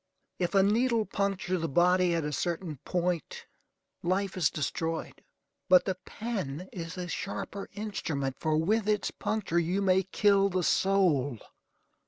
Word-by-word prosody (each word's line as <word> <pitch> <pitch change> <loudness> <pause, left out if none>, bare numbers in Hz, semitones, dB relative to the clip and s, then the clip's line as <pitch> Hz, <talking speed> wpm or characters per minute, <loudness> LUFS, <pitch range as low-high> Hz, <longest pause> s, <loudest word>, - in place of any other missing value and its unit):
If 180 +2 -1
a 195 - +6
needle 225 +2 +2
puncture 190 -3 -1
the 165 - -2
body 180 +3 +3
at 165 -3 -1
a 150 - -2
certain 170 -1 -2
point, 175 -3 -2 0.6
life 190 +2 0
is 175 -6 +3
destroyed; 160 +2 -3 0.5
but 185 -1 +7
the 190 - 0
pen 185 - -5
is 165 -1 -6
a 180 -1 -4
sharper 195 +2 -5
instrument, 160 -10 -3
for 155 -1 +1
with 210 +6 +1
its 210 -2 +1
puncture 200 -6 -1
you 175 +4 0
may 190 -1 +3
kill 200 +1 +3
the 185 -1 0
soul. 165 - +2
185 Hz, 145 wpm, -29 LUFS, 165-200 Hz, 0.6 s, but